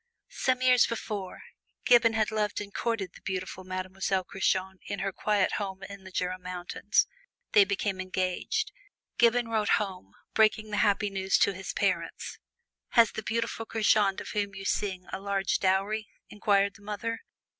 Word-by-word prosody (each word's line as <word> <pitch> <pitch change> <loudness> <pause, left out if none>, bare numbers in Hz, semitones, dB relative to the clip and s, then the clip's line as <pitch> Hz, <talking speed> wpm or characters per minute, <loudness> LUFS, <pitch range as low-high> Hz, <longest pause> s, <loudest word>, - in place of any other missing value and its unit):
Some 255 -1 0
years 250 -2 +6
before, 210 -4 -5 0.4
Gibbon 235 -2 +6
had 220 0 +1
loved 210 -1 0
and 205 -1 -7
courted 220 -6 -2
the - - -15
beautiful 185 0 -4
Mademoiselle 185 +1 -2
Curchod 190 0 -1
in 205 - -3
her 195 0 -2
quiet 205 -1 +1
home 190 -1 -5
in 195 -1 -9
the 190 - -10
Jura 185 0 -2
Mountains. 180 -1 0 0.5
They 205 - +7
became 195 -1 -1
engaged. 185 - -1 0.5
Gibbon 240 0 +4
wrote 220 -2 +3
home, 190 - -5 0.2
breaking 215 0 +3
the 210 - -1
happy 205 0 +2
news 190 0 +2
to 200 - +3
his 190 0 -5
parents. - - -1 0.5
"Has 230 -3 +6
the - - -5
beautiful 230 0 -2
Curchod 210 -3 +3
of - - -7
whom 200 -1 -2
you 195 0 -7
sing, 190 -3 -1
a 190 - -2
large 195 -1 0
dowry?" 195 +3 +1 0.2
inquired 200 -1 +2
the - - -21
mother. 210 +2 -3
200 Hz, 160 wpm, -29 LUFS, 190-215 Hz, 0.5 s, They